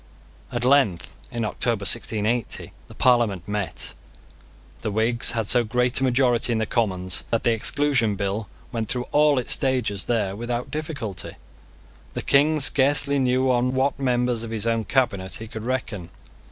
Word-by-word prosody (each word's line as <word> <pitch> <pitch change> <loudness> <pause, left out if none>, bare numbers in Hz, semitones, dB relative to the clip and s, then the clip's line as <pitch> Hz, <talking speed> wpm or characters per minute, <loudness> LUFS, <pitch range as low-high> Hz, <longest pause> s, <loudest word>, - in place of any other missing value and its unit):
At 120 -1 -2
length, 125 -10 +2 0.2
in 120 -3 -3
October 115 -1 -1
1680, 110 +2 0
the - - -14
Parliament 120 -8 +2
met. 105 -2 -3 0.9
The - - -2
Whigs 115 +4 +1
had 115 -3 -2
so 120 +1 +2
great 125 +3 0
a - - +1
majority 125 -2 +2
in 115 - +1
the 110 - 0
Commons 95 -6 -1
that 115 - 0
the 120 - +3
Exclusion 115 -1 +2
Bill 100 +2 -3 0.2
went 115 -3 -3
through 125 -1 -2
all 150 -1 +4
its 125 - +2
stages 125 -7 0
there 105 -5 -1
without 120 +2 -4
difficulty. 150 - -5 0.8
The - - -3
King 150 +3 +3
scarcely 140 0 +3
knew 130 0 +2
on 125 +1 +1
what 135 +1 0
members 125 -3 0
of 115 - -6
his 110 -1 -3
own 115 -1 0
cabinet 100 -8 0
he 110 - -8
could 110 0 -7
reckon. 120 -8 -3
120 Hz, 160 wpm, -23 LUFS, 110-130 Hz, 0.9 s, all